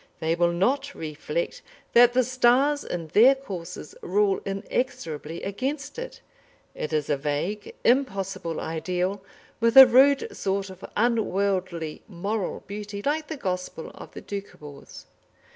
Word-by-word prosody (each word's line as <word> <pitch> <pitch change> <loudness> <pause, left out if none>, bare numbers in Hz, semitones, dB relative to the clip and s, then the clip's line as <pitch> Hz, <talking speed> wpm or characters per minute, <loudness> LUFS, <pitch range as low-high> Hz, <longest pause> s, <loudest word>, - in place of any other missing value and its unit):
They 160 +1 0
will 170 0 +2
not 275 +11 0
reflect 455 - -4 0.3
that 240 0 +7
the 255 0 +4
stars 255 +4 +3
in 165 -3 -5
their 245 - +6
courses 180 - -8
rule 195 +1 +1
inexorably 195 - -3
against 270 - -4
it. - - -7 0.5
It 155 - -5
is 155 -1 0
a 145 - +1
vague, 150 +9 -3
impossible 195 - 0
ideal, 180 +4 -2 0.4
with 230 +2 +2
a 265 - +14
rude 280 - +4
sort 195 0 -2
of 185 0 -13
unworldly 195 -7 0
moral 200 +1 -3
beauty, 205 0 -6
like 300 +2 -1
the 315 - -5
gospel 180 -6 -4
of - - -12
the - - -8
Doukhobors. 150 -8 -9
200 Hz, 130 wpm, -25 LUFS, 175-255 Hz, 0.5 s, a